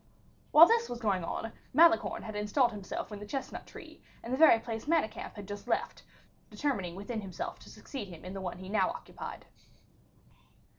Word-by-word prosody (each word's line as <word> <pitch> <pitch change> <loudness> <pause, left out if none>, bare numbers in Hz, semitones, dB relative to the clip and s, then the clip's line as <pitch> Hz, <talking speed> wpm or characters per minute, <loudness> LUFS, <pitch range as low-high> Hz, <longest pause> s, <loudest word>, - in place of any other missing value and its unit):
While 315 +2 +10
this 465 +4 +2
was 240 - -4
going 200 -6 0
on, 225 +6 -4 0.2
Malicorne 335 +2 +5
had 215 -1 -7
installed 210 +5 +2
himself 205 0 -5
in 205 - -6
the 210 - -7
chestnut 270 +4 -5
tree, - - -12 0.2
in 235 - -6
the - - +2
very 315 -7 +8
place 225 -1 -5
Manicamp 310 -9 0
had 205 -2 -8
just 205 0 -7
left, - - -1 0.5
determining 200 -13 -2
within 215 +3 -4
himself 190 -4 -6
to - - -14
succeed 260 -8 -7
him 170 -2 -11
in 185 - -6
the 195 - -5
one 180 -2 -4
he 185 +1 -9
now 210 +3 +2
occupied. - - -8
215 Hz, 185 wpm, -31 LUFS, 195-265 Hz, 0.5 s, While